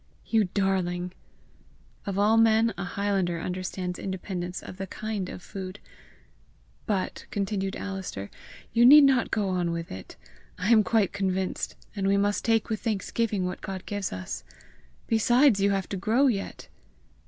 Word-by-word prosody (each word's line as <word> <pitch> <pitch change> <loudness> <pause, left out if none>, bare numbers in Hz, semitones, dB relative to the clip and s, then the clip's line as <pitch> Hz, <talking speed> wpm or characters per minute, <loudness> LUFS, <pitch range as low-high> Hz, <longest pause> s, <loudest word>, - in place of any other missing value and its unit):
"You 220 -2 +3
darling!" 180 -2 -1 1.0
Of 195 -1 -2
all 210 +2 +4
men 225 0 +4
a 195 - -4
highlander 190 -2 -1
understands 180 +1 -4
independence 180 -1 -4
of 185 - -9
the 195 0 -5
KIND 215 -3 -4
of 180 - -8
food. 190 0 -7 1.1
"But," 195 -3 -2
continued 195 -1 -2
Alister, 190 - -5 0.4
"you 235 - +5
need 290 +4 +10
not 265 -3 +4
go 210 -3 0
on 180 -2 0
with 170 0 -4
it; 95 0 -9 0.4
I 195 +5 0
am 220 -2 +7
quite 215 -3 +2
convinced; 190 -1 -2 0.2
and 195 -1 -1
we 200 0 +3
must 205 +1 +1
take 225 -2 +2
with 220 -2 -3
thanksgiving 215 -2 -1
what 180 0 -4
God 190 -2 -6
gives 205 -2 -3
us. 95 0 -5 0.6
Besides, 240 +1 +4
you 200 +1 +3
have 195 -2 0
to 195 - -3
grow 225 +8 +2
yet!" 215 -7 -1
195 Hz, 155 wpm, -27 LUFS, 185-220 Hz, 1.1 s, need